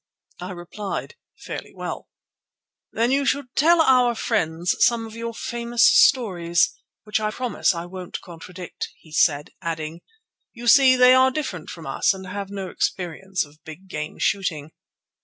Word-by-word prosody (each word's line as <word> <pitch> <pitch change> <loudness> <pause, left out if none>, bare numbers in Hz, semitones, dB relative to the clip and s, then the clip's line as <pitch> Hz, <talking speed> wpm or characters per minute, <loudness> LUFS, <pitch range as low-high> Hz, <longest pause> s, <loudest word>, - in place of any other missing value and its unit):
I 180 0 -6
replied, 195 - -6 0.2
"Fairly - - -8
well." - - -6 0.8
"Then 235 +2 +1
you 280 +1 +2
should 275 -2 -1
tell 330 +3 +5
our 250 -4 +4
friends 175 -7 0
some 235 -1 +3
of 220 0 -10
your 230 0 -4
famous 235 0 -1
stories, 180 -7 +4 0.3
which 210 0 -1
I 215 0 -1
promise 225 -4 0
I 170 0 -5
won't 180 0 -7
contradict," 180 +1 -8
he 160 - -20
said, 145 -1 +2
adding: 160 0 -4 0.5
"You 240 0 -8
see, 260 +1 +7
they 250 0 +7
are 260 0 +6
different 260 - -5
from 165 -2 -9
us, 135 +7 +1
and 190 0 -9
have 200 +1 -5
no 195 -1 -5
experience 185 +1 -2
of 150 +1 -22
big 175 +3 -11
game 150 -2 -5
shooting." 160 -6 -1
195 Hz, 155 wpm, -23 LUFS, 170-240 Hz, 0.8 s, see